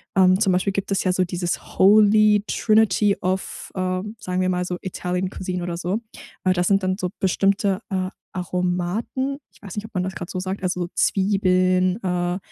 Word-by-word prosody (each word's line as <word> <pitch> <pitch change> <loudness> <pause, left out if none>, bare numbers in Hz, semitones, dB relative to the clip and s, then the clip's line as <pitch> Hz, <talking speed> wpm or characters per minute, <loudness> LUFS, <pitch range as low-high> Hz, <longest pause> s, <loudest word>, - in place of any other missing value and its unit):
Ähm, 185 -1 +5
zum 200 -4 +3
Beispiel 185 +2 +1
gibt 200 0 -3
es 195 - +1
ja 185 - +2
so 185 - +2
dieses 175 0 -4
Holy 210 +1 +6
Trinity 215 -2 +3
of, 185 +1 -3
ähm, 185 +3 -2
sagen 185 -3 -2
wir 185 - +1
mal 180 0 0
so, 180 0 -3
Italian 180 0 -3
cuisine 180 -1 -4
oder 175 -1 -3
so. 180 +4 -1 0.5
Das 185 -1 +2
sind 195 -1 +3
dann 185 0 0
so 180 - -1
bestimmte, 195 +1 +1
äh, 185 -1 -1 0.2
Aromaten. 180 +9 -2
Ich - - -23
weiß 200 -4 -9
nicht, 210 0 -4
ob 220 - -13
man 180 - +1
das 190 +1 -3
grad 175 -1 -7
so 185 - -4
sagt, 185 +1 -4
also 180 -1 -1
Zwiebeln, 185 -2 +2
äh, 180 -1 -1
185 Hz, 185 wpm, -22 LUFS, 180-200 Hz, 0.5 s, Holy